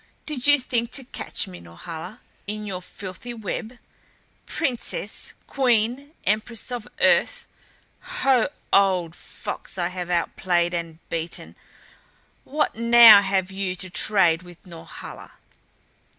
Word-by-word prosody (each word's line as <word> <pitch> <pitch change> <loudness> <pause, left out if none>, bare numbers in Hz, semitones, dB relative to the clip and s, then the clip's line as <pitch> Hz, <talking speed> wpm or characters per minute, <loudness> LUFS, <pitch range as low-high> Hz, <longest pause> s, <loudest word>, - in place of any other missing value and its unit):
"Did 285 -4 -4
you 290 0 +7
think 235 -2 -1
to 275 - -2
catch 245 - -3
me, 90 -1 -10
Norhala, 160 - -9 0.3
in 210 +1 -4
your 185 -3 -4
filthy 195 +6 -8
web? 225 +2 -5 0.7
Princess! 290 - -2
Queen! 250 +2 +1
Empress 220 +4 -1
of 245 -2 -4
Earth! - - +3 0.5
Ho 260 -4 +1 0.2
old 185 -4 +3
fox - - -7
I 175 -1 0
have 180 -1 -5
outplayed 175 0 +1
and 165 -2 -4
beaten, 165 0 -5 0.9
what 300 +3 0
now 235 -2 +9
have 195 -1 0
you 190 -1 -3
to 185 0 -8
trade 180 -5 +3
with 175 +1 -15
Norhala?" 170 -3 -10
200 Hz, 120 wpm, -24 LUFS, 175-240 Hz, 0.9 s, now